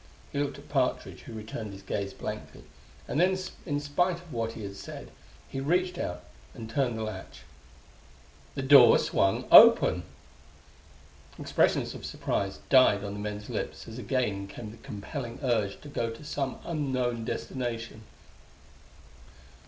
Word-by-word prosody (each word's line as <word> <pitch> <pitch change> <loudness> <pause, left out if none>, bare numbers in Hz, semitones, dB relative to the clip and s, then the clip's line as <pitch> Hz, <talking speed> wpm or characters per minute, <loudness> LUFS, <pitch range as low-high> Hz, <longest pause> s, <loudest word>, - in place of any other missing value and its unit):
He 140 - -2
looked 145 0 -1
at 140 - -14
Partridge, 135 -3 -1
who 120 - -10
returned 110 -1 -6
his 95 0 -11
gaze 100 0 -3
blankly - - -7 0.4
and - - -1
then, 185 +1 +3 0.3
in 145 -2 0
spite 170 +5 +1
of 175 -2 -12
what 115 -1 -2
he 110 - -8
had 100 0 -6
said, - - -9 0.4
he 135 - -5
reached 180 +6 0
out 90 - -4 0.3
and 110 - -7
turned 120 0 0
the 110 - -3
latch. 105 -3 -7 1.1
The 135 - -3
door 140 +1 +8
swung 95 0 +1
open! - - +9 1.4
Expressions - - +1
of - - -9
surprise 95 -1 -2
died 130 -7 +5
on 100 -1 -4
the 105 - -6
men's 105 0 -5
lips - - -5
as 115 +2 -8
again 110 -7 -1
came 105 +2 -8
the 115 - -13
compelling 115 +3 -6
urge 110 -6 0
to - - -11
go 120 -5 -2
to 115 +5 -9
some 140 -3 -3
unknown 130 -7 -1
destination. 115 -2 -4
120 Hz, 150 wpm, -29 LUFS, 105-140 Hz, 1.4 s, open